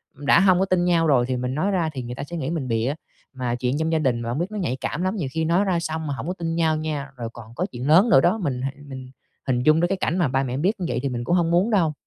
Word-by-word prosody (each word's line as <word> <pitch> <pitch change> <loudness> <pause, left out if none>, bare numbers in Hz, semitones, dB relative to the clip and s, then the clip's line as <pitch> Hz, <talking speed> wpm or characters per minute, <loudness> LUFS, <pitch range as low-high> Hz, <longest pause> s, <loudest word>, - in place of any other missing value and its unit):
đã 145 +3 +3
hông 185 -2 +4
có 190 - +3
tin 185 -2 +1
nhau 170 -2 +3
rồi 130 -5 +3
thì 130 -1 -1
mình 125 +1 -3
nói 190 +7 0
ra 175 -4 0
thì 130 - -4
người 120 +1 -6
ta 140 - -5
sẽ 170 +4 -6
nghĩ 140 -1 -3
mình 160 -6 -3
bịa, 115 +3 0 0.4
mà 125 -2 -2
chuyện 125 +3 -1
trong 160 0 0
gia 160 - +2
đình 125 -5 +1
mà 115 - -4
hông 125 +5 -2
biết 180 +4 -2
nó 215 - -5
nhạy 130 -10 -1
cảm 165 - -3
lắm, 185 +3 0
nhiều 160 -10 -3
khi 160 +3 -1
nói 175 +5 +2
ra 185 -3 +1
xong 160 -1 -4
mà 145 - -2
hổng 135 - -6
có 180 - -1
tin 165 -3 -3
nhau 160 -2 +2
nha, 150 -3 -4
rồi 115 -2 -5
còn 115 0 -12
có 180 - -1
chuyện 125 +3 -5
lớn 180 +10 +6
nữa 180 -11 +6
đó, 180 +8 +2
mình 135 - -2
h - - -2 0.2
mình 130 -1 -8 0.4
hình 125 -1 +1
dung 155 +3 +5
đến 175 - +3
cái 195 - 0
cảnh 175 - -1
mà 175 -4 +2
ba 135 +1 0
mẹ 130 -1 -3
biết 190 +9 0
như 180 - -2
vậy 120 -1 -1
thì 140 - 0
mình 120 -1 -3
cũng 175 +9 +1
hông 170 -2 +1
muốn 180 +6 +3
đâu. 170 -7 +2
155 Hz, 335 wpm, -23 LUFS, 130-175 Hz, 0.4 s, lớn